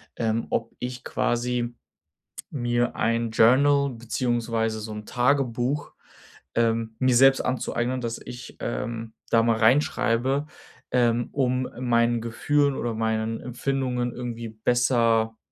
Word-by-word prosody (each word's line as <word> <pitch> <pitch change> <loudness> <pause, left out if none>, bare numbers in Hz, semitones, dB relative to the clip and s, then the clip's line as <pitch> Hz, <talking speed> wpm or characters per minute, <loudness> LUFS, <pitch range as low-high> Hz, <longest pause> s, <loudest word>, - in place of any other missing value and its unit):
ähm, 115 0 -1
ob - - -2
ich 125 0 -6
quasi 120 0 -1 0.8
mir 120 -3 0
ein 115 0 0
Journal 140 +5 +4
beziehungsweise 115 -2 -1
so 110 0 -6
'n 105 0 -7
Tagebuch, 125 +2 0 0.6
ähm, 115 -1 +1
mir 130 -1 +2
selbst 135 +2 +6
anzueignen, 130 0 -1
dass 115 -1 -3
ich, 120 0 -9
ähm, 115 -1 -4 0.2
da 115 -1 +4
mal 115 -1 +2
reinschreibe, 130 +3 +2 0.4
ähm, 120 -1 +2
um 130 -2 0
meinen 120 -1 +2
Gefühlen 140 +5 +1
oder 120 -3 -2
meinen 110 0 -1
Empfindungen 125 -1 -2
irgendwie 120 -1 -5
besser, 115 0 +2
120 Hz, 115 wpm, -25 LUFS, 115-125 Hz, 0.8 s, selbst